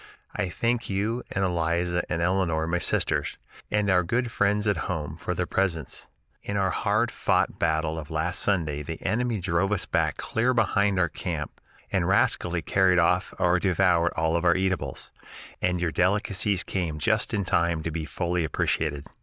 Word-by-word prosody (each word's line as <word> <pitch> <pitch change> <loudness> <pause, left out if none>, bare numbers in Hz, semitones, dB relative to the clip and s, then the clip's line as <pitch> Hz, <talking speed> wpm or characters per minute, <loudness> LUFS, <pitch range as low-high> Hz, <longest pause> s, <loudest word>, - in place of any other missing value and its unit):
I 95 - -1
thank 115 +6 -1
you 105 +5 -1
and 95 0 0
Eliza 85 0 0
and 85 +1 -1
Eleanor 85 -3 +1
[my 85 +2 0
sisters] - - -1 0.3
and 105 -1 +1
our 95 -2 +4
good 120 +7 -1
friends 105 +1 +1
at 100 -1 0
home 75 -5 -3
for - - -4
their - - -1
presents. 85 -7 -2 0.3
In 100 - -3
our 95 -2 +1
hard 110 +4 +1
fought - - 0
battle 80 0 0
of 75 -1 -9
last 80 +2 -1
Sunday 80 -7 0
the 80 +2 -6
enemy 115 +2 0
drove 90 +2 0
us 105 - -1
back - - 0
clear 125 +3 0
behind 100 -3 +2
our 90 -2 +3
camp 75 -1 -5 0.3
and - - +1
rascally 85 -2 +2
carried 95 +1 +3
off 90 +1 +2
or 90 -1 +3
devoured 90 -2 +2
all 80 0 +1
our 85 -1 +4
eatables, 95 -8 -2 0.5
and 90 -1 +1
your 85 -2 0
delicacies 100 +1 +1
came 85 -5 -2
just 110 +8 +1
in 105 -3 0
time 85 -3 +1
to 85 - -3
be 80 0 -3
fully 85 +2 -1
appreciated. 75 -1 -1
90 Hz, 170 wpm, -26 LUFS, 85-100 Hz, 0.5 s, our